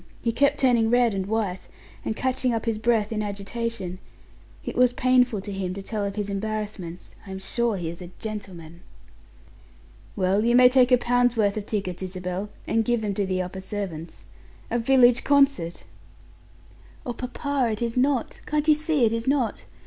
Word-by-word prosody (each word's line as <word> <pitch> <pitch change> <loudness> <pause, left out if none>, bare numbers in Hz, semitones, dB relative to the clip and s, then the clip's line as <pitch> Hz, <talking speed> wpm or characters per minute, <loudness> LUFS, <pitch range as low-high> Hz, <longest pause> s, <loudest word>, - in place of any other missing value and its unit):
He 235 - +1
kept 275 +5 +2
turning 240 -4 +3
red 240 -2 +3
and 190 -1 -2
white, 205 -4 -2 0.4
and 220 - -2
catching 255 -1 0
up 225 - -3
his 225 -2 -1
breath 220 -2 +1
in 215 -1 -1
agitation; 200 -2 -4 0.7
it - - -4
was 250 0 +4
painful 250 -4 +3
to 205 - -7
him 190 -2 -3
to 195 - -6
tell 210 0 -3
of 200 -1 -3
his 205 -1 -2
embarrassments. 205 -3 -5
I - - -9
am 190 - -5
sure 220 +3 -1
he 175 -3 -4
is 170 +2 -7
a 175 - -8
gentleman." 180 -6 -8 1.3
"Well, 195 +2 +2
you 235 +1 +3
may 250 0 +8
take 255 -1 +4
a 250 - +7
pound's 245 0 +2
worth 205 -2 +2
of 210 -1 -5
tickets, 190 -4 -3
Isabel, 185 +1 -4 0.2
and 225 - +1
give 240 0 0
them 205 -1 -1
to 195 0 -1
the 185 -1 0
upper 190 +1 -7
servants. 185 -5 -6 0.5
A 240 - +1
village 245 0 +5
concert!" 275 - +2 1.2
"Oh, 245 - -3
papa, 260 +1 -2
it 215 - -6
is 230 -1 -2
not 260 -1 0
can't 300 0 0
you 310 - +7
see 305 -3 +1
it 225 - +1
is 230 +1 -3
not? 265 -5 0
220 Hz, 185 wpm, -25 LUFS, 195-245 Hz, 1.3 s, may